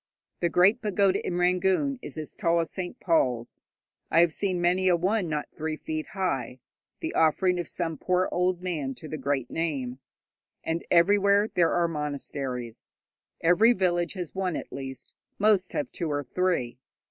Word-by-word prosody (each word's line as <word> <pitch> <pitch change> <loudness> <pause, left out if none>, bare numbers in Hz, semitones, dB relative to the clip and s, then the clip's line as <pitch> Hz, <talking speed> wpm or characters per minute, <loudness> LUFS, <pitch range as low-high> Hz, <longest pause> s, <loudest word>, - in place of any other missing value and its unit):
The 170 - +1
great 195 +8 +4
pagoda 200 -3 +2
in 175 - -2
Rangoon 190 +9 +2
is - - -8
as 155 -1 -5
tall 170 -3 +2
as 165 - -2
St. 180 -2 -6
Paul's; 125 -9 0 0.5
I 165 - +5
have 170 -2 +3
seen 185 -1 -1
many 180 +2 +2
a 180 - +5
one 185 +1 0
not 150 -1 -3
three 155 0 -4
feet 155 0 -4
high 155 -10 -2 0.4
the - - -3
offering 180 +3 +3
of 175 - -3
some 165 -4 -3
poor 185 0 +1
old 180 0 0
man 150 -7 -3
to 125 - -9
the 155 0 -5
Great 135 -2 -1
Name, 135 -6 -2 0.6
and 165 +1 -2
everywhere 200 +4 +4
there 170 -2 +3
are 175 -1 +2
monasteries. 140 -6 -5 0.5
Every 200 +8 +5
village 175 -4 0
has 180 -5 -6
one, 185 -3 -1
at - - -6
least; 135 -1 -7 0.2
most 200 -3 +3
have 290 -4 -2
two 170 -3 -3
or 145 0 -1
three. 140 -8 -1
175 Hz, 170 wpm, -27 LUFS, 150-185 Hz, 0.6 s, I